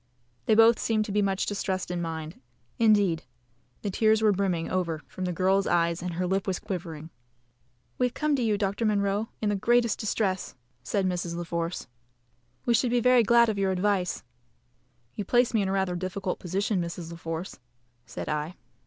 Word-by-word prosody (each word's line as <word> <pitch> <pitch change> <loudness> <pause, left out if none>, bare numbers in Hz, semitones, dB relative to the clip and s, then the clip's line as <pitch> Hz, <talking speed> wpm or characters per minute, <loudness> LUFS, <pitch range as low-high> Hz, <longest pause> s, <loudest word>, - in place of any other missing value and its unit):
They 220 - +5
both 225 +1 +6
seemed 215 -1 +1
to 210 - -5
be 210 +1 +2
much 195 -1 0
distressed 190 -3 -2
in 175 -1 -2
mind 160 -2 -5 0.4
indeed, 205 -7 +3 0.6
the 205 - -1
tears 220 +2 +3
were 215 - +5
brimming 185 -4 0
over 170 -4 -2
from 185 - -5
the 180 - -1
girl's 190 +3 +2
eyes, 170 0 +1
and 175 -1 -4
her 180 +1 -1
lip 190 +2 -1
was 190 -2 0
quivering. 165 -6 -6 0.9
"We 250 - +4
have 245 - -9
come 300 -1 +1
to - - -1
you, 215 -3 +2
Doctor 200 +2 -1
Munro, 205 0 +1
in 210 - +2
the 205 - +1
greatest 235 +2 +2
distress," 200 -3 -1 0.3
said 195 +9 -1
Mrs. 175 -2 -2
La 175 - -3
Force; 170 +1 -3 0.8
"we 240 - +3
should 240 +2 +2
be 245 +1 +2
very 250 +1 +5
glad 235 +2 +5
of 210 -2 -1
your 195 -1 +2
advice." 190 -1 0 0.9
"You 205 - -4
place 245 +4 +2
me 220 - +3
in 195 - -1
rather 190 -2 0
a 175 - -3
difficult 185 0 -3
position, 190 +2 -1
Mrs. 170 0 -5
La 170 - -8
Force," 165 +2 -5 0.5
said - - -6
I. 150 +3 -2
195 Hz, 190 wpm, -27 LUFS, 175-215 Hz, 0.9 s, both